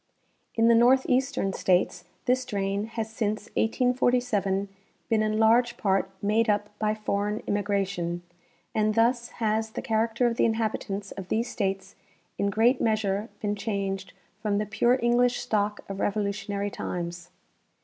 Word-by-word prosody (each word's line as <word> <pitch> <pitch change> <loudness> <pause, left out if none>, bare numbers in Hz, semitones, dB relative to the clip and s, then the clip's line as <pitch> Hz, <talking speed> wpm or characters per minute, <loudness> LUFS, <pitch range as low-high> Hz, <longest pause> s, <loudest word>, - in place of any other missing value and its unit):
In 225 0 +4
the 235 - +6
northeastern 255 -2 +3
states 180 -1 +1 0.2
this 255 +1 +2
drain 200 -3 -2
has 225 -1 -4
since 215 -2 -2
1847 245 -5 +1 0.4
been 225 -2 +3
in 215 0 0
large 235 +2 +4
part 195 -1 +1
made 220 +2 +2
up 210 0 +1
by 215 0 +1
foreign 210 0 -2
immigration, 195 -4 -1 0.5
and 215 0 +1
thus 235 +1 +2
has 220 0 0
the - - -5
character 225 +2 +1
of 235 -1 +1
the - - +4
inhabitants 215 -3 -2
of 195 -2 -7
these 235 +2 0
states 195 -2 -2 0.5
in 200 - +2
great 230 +6 +3
measure 215 -1 0
been 205 -1 -1
changed 195 -3 -3 0.3
from 205 -2 0
the 210 - 0
pare 240 +4 +2
English 245 +1 +3
stock 210 -1 -1
of 195 0 -6
Revolutionary 200 0 -1
times. 175 -1 -5
215 Hz, 140 wpm, -27 LUFS, 200-230 Hz, 0.5 s, the